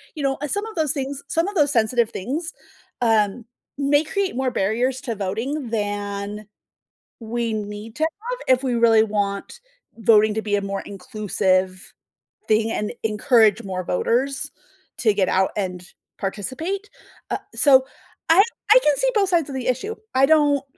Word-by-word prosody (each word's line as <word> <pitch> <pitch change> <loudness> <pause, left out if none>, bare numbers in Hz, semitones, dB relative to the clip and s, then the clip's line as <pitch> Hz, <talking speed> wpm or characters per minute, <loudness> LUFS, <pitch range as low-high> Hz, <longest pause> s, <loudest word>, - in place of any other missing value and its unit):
you 295 - -5
know, 270 0 0
uh, 295 - -2
some 405 +7 -1
of 445 - -8
those 310 -4 0
things 275 -1 -3
some 330 +3 0
of 410 - -4
those 295 -6 +3
sensitive 230 -1 +2
things, 300 - -4 0.5
um, 220 -1 +2 0.3
may 290 +1 +3
create 390 -1 -2
more 260 -1 0
barriers 245 +5 0
to 230 -3 -4
voting 225 +8 -3
than 205 -1 -3 0.8
we 230 0 -2
need 210 +1 -6
to 310 - -5
have 440 +10 -2 0.2
if - - -14
we 255 -2 0
really 230 -2 +5
want 205 - -3 0.4
voting 215 -1 +4
to 220 - -2
be 205 -1 0
a 200 - 0
more 195 0 -3
inclusive 190 -3 -1 0.6
thing 220 +1 +2
and 210 -2 -2
encourage 220 0 +3
more 185 -2 -4
voters 255 +10 0 0.5
to 220 -4 +3
get 195 -2 +1
out 190 0 +2
and 180 -3 -4 0.3
participate. 315 - -4 0.4
Uh - - +1 0.2
so, 265 -3 +5 0.5
I 345 +4 +8 0.3
I - - +10
can 295 -2 +4
see - - +1
both 405 -3 +2
sides 335 -5 +1
of 270 - -5
the 255 - -4
issue. 260 - -1 0.2
I 265 +1 +5
don't 290 -2 +3
235 Hz, 165 wpm, -22 LUFS, 205-285 Hz, 0.8 s, I